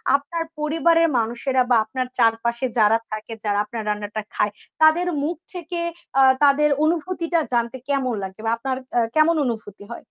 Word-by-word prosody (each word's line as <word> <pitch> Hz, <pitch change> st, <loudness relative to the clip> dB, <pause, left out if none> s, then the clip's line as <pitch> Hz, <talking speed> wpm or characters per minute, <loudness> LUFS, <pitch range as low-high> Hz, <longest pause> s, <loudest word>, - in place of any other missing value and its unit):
আপনার 330 Hz, +4 st, -2 dB, 0.2 s
পরিবারের 330 Hz, +2 st, +3 dB
মানুষেরা 240 Hz, +3 st, 0 dB
বা -, -, +6 dB
আপনার 255 Hz, +3 st, -3 dB
চারপাশে 235 Hz, +1 st, +1 dB
যারা 220 Hz, +1 st, +5 dB
থাকে 215 Hz, +1 st, -6 dB
যারা 205 Hz, -1 st, 0 dB
আপনার 225 Hz, 0 st, -6 dB
রান্নাটা 210 Hz, +1 st, -3 dB
খায় 210 Hz, 0 st, +1 dB, 0.3 s
তাদের 330 Hz, +3 st, +5 dB, 0.2 s
মুখ 335 Hz, +3 st, -1 dB, 0.2 s
থেকে 345 Hz, -1 st, -4 dB, 0.4 s
আ -, -, +7 dB, 0.2 s
তাদের 290 Hz, +1 st, +5 dB, 0.2 s
অনুভূতিটা 335 Hz, +1 st, 0 dB
জানতে 235 Hz, +2 st, 0 dB
কেমন 265 Hz, -3 st, 0 dB
লাগে 190 Hz, +2 st, -8 dB
বা 225 Hz, -, +1 dB
আপনার 260 Hz, +2 st, -3 dB, 0.2 s
আ -, -, +5 dB, 0.2 s
কেমন 320 Hz, +2 st, +4 dB
অনুভূতি 220 Hz, -4 st, -5 dB
হয়? 235 Hz, -, -6 dB
255 Hz, 160 wpm, -22 LUFS, 225-315 Hz, 0.4 s, আ